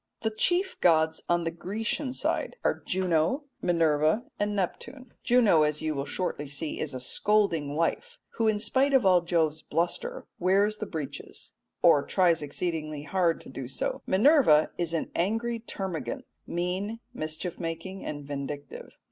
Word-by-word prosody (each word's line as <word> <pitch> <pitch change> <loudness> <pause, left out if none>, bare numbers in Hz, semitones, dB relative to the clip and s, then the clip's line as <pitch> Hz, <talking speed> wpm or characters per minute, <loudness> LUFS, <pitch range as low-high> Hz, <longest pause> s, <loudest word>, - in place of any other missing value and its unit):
The 220 -1 0
chief 355 - 0
gods 160 -2 +3
on 175 0 +2
the 165 - -1
Grecian 225 - -3
side 260 - -1
are - - +1
Juno, 180 - +1 0.2
Minerva, 160 +3 +2 0.2
and 205 0 0
Neptune. 240 +7 -4
Juno, 235 -10 +5
as 150 0 +1
you 155 -1 0
will 140 -1 -3
shortly 165 -5 -3
see, 140 +3 -4
is 145 -4 -3
a - - -3
scolding 165 0 +1
wife, 485 - -1
who 225 - 0
in 215 -1 +3
spite 265 +6 +2
of 250 -6 +4
all 180 -2 +6
Jove's 160 -3 +1
bluster 320 - -2
wears 200 +4 +3
the 215 - -4
breeches, 155 -6 -6 0.3
or 160 -4 +7
tries 175 +1 +2
exceedingly 155 -1 -3
hard 170 +1 +1
to - - -12
do 130 -1 -6
so. 135 - -3
Minerva 200 - +5
is 170 -1 -1
an 165 - -2
angry 225 +6 0
termagant 185 - -4 0.2
mean, 185 +6 -2
mischief 155 +3 -4
making, 165 +3 -5
and 145 -1 -5
vindictive. 140 0 -6
175 Hz, 155 wpm, -28 LUFS, 155-215 Hz, 0.3 s, or